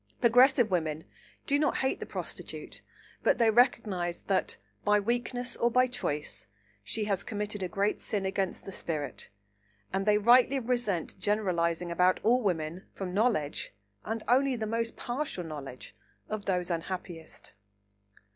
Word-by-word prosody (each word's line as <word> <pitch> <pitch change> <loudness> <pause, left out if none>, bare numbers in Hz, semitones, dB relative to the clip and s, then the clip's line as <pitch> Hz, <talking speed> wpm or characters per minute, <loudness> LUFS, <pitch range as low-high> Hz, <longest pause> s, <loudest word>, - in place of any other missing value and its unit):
Progressive 245 -1 +5
women 160 -3 -1 0.4
do 285 0 +2
not 300 - +2
hate 265 - 0
the - - -6
prostitute, - - -7 0.4
but - - +3
they 230 -2 +4
recognise 210 -7 +2
that, 190 -2 0 0.3
by 210 0 +4
weakness 245 +3 -1
or 235 - +2
by 250 +2 +4
choice, 145 - -3 0.4
she 215 - -2
has 200 -3 0
committed 210 -1 -3
a 185 - -1
great 200 +3 0
sin 200 -2 -2
against 190 -1 -2
the 195 - -6
spirit, 155 -5 -4 0.6
and 195 +2 -1
they 210 0 +5
rightly 245 +5 +5
resent 235 -8 -1
generalising 175 -5 0
about 180 +2 +3
all 245 +3 +4
women 170 -3 -2
from 185 -2 -5
knowledge 200 -9 0 0.3
(and 225 0 -3
only 260 +2 +3
the 220 -2 -3
most 230 +1 -2
partial 245 -7 -3
knowledge) 145 -5 -8 0.3
of 215 -1 -4
these 180 -2 0
unhappiest. 170 -1 -6
205 Hz, 145 wpm, -30 LUFS, 175-240 Hz, 0.6 s, Progressive